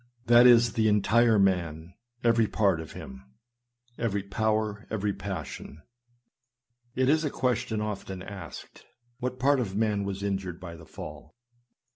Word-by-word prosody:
That 120 +1 +7
is, 120 -2 +6
the 110 -1 +2
entire 110 +2 +4
man, 85 -4 0 0.3
every 115 -2 +3
part 100 -6 +2
of 80 - -10
him 65 0 -9 0.4
— 120 0 -41
every 100 -4 -1
power, 105 +1 -1
every 105 -2 -1
passion. 80 -6 -7 1.1
It 130 0 +2
is 155 +3 +3
a 150 - 0
question 120 -4 -1
often 95 -3 -5
asked, 100 0 -10 0.2
" 120 0 -42
What 125 0 -3
part 140 +2 +3
of 100 -6 -3
man 105 -2 +1
was 100 0 -4
injured 95 -3 -3
by 85 -2 -8
the 80 -1 -14
fall?" 75 0 -10
105 Hz, 150 wpm, -28 LUFS, 95-120 Hz, 1.1 s, That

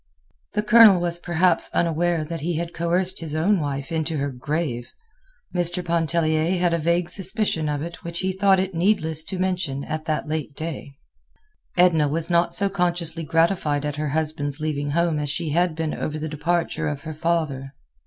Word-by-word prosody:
The 210 - 0
Colonel 215 -3 +7
was 175 0 -1
perhaps 175 0 +2
unaware 170 0 +1
that 165 -1 -5
he 170 +2 -1
had 170 +1 -3
coerced 175 +3 0
his 155 -2 -5
own 185 +5 +2
wife 140 0 -3
into 160 -1 -1
her 140 0 -1
grave. 130 -2 -3 0.6
Mr. 175 0 +1
Pontellier 165 0 +1
had 175 -1 +1
a 170 - +1
vague 170 +2 +1
suspicion 185 -3 +1
of 145 0 -2
it 170 +2 -8
which 170 0 -5
he 190 0 0
thought 190 0 +3
it 190 0 -2
needless 165 -3 +1
to 190 - -4
mention 180 -7 -1
at 155 0 -4
that 155 -1 -2
late 155 -2 -3
day. 155 -3 -6 0.8
Edna 170 -4 +4
was 165 +4 -1
not 170 0 +3
so 200 - +3
consciously 175 -3 -1
gratified 160 -2 +1
at 150 0 -3
her 150 -1 -2
husband's 150 -1 -2
leaving 145 -2 -2
home 165 0 +1
as 145 -1 -2
she 155 +1 -2
had 175 +1 +1
been 160 -1 -2
over 155 0 -3
the 155 +1 -4
departure 160 +1 -1
of 145 -1 -4
her 160 -1 -5
father. 150 -4 -2
165 Hz, 185 wpm, -23 LUFS, 150-175 Hz, 0.8 s, Colonel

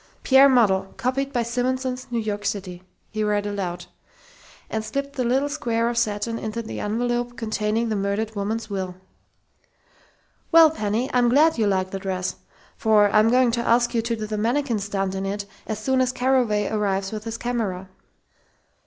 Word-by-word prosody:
"'Pierre 270 +1 +7
Model. 195 -7 +3
Copied 270 +3 -1
by 240 -3 0
Simonson's 255 +2 -2
New 240 - -2
York 210 -2 -2
City'," 185 -3 -4 0.3
he 215 0 -2
read 205 -1 0
aloud, 195 -4 -4 0.8
and 220 0 -3
slipped 275 +6 -4
the 255 - 0
little 260 +4 +1
square 235 -6 -1
of 240 - -3
satin 230 0 -1
into 225 +1 -4
the 220 - -6
envelope 240 +2 -2
containing 220 +1 -1
the 215 - 0
murdered 200 +2 -1
woman's 215 +3 -2
will. 190 -3 -4 1.6
"Well, 325 -2 +8
Penny, 220 -3 -1
I'm 245 -1 +4
glad 295 +2 +4
you 215 - +3
like 190 -1 0
the 195 - -4
dress, 185 -1 -3 0.4
for 215 -4 +4
I'm 215 +2 +5
going 250 0 +4
to 235 0 -1
ask 240 +1 +2
you 230 - +2
to 230 +1 -2
do 215 -1 -5
the 215 0 -3
mannikin 235 +1 0
stunt 195 -1 -2
in 190 0 -3
it 200 +1 -3 0.2
as 215 - -2
soon 260 +4 +1
as 255 -1 +1
Carraway 250 -6 +1
arrives 195 -2 -1
with 215 0 -6
his 225 0 -4
camera." 215 -7 -3
225 Hz, 175 wpm, -23 LUFS, 205-245 Hz, 1.6 s, Well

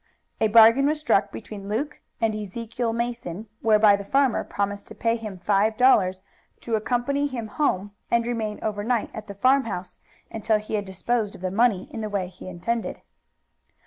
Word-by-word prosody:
A 220 - +3
bargain 230 +5 +7
was 305 +1 0
struck 295 -9 +2
between 200 -2 -8
Luke 285 +8 -3 0.2
and 225 -2 +1
Ezekiel 225 +3 -3
Mason 230 -4 -4
whereby 215 -2 +5
the 200 - -5
farmer 265 +4 +2
promised 200 0 -3
to - - -10
pay 230 0 +1
him 215 -4 -6
five 205 +4 +1
dollars 190 -8 +4 0.4
to 235 - -5
accompany 245 +6 0
him 245 -5 -5
home 205 -4 -1 0.2
and 235 0 +2
remain 225 -3 -2
overnight 215 +2 -1
at 215 -1 -8
the 200 - -8
farmhouse 230 -6 +1 0.3
until 220 0 +1
he 210 +1 -8
had 205 -1 0
disposed 210 +3 -2
of - - -13
the 185 -1 -2
money 210 -2 +2
in 225 - -4
the 215 - -3
way 195 -3 -2
he 185 0 -12
intended. 220 +7 -3
220 Hz, 175 wpm, -25 LUFS, 200-235 Hz, 0.4 s, bargain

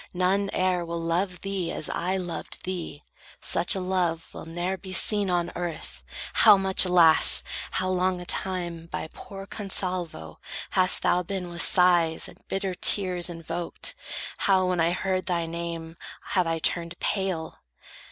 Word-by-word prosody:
None 190 +2 +1
e'er 185 -1 0
Will 170 0 -4
love 180 +3 -2
thee 195 -4 -3
as 155 - -2
I 185 +3 -2
loved 175 -3 -6
thee. 175 -5 -5 0.4
Such 170 +3 +3
a - - -2
love 180 -3 -2
Will - - -9
ne'er 175 +3 -2
be 190 0 -9
seen 205 +1 +4
on 175 -1 0
earth. 170 - -6 0.3
How 200 - +7
much, 190 0 +5
alas, 170 -3 +5 0.3
How 185 - -1
long 185 0 0
a 180 - -8
time 175 -3 -3
by 160 - -5
poor 195 -5 -10
Consalvo 180 - -2 0.3
hast 185 -1 +2
Thou 180 - +3
been 180 -1 -5
with 170 -1 -1
sighs 175 -3 +4
and - - -15
bitter 195 -1 -2
tears 180 -1 +3
invoked! 165 0 -5 0.4
How, 190 -2 +2
when 180 -1 0
I 165 - +3
heard 185 +1 -2
thy 170 -2 0
name, 165 0 -6 0.3
have 185 -3 +1
I 165 0 0
turned 170 +1 0
pale! 185 -5 -2
180 Hz, 155 wpm, -26 LUFS, 170-185 Hz, 0.4 s, How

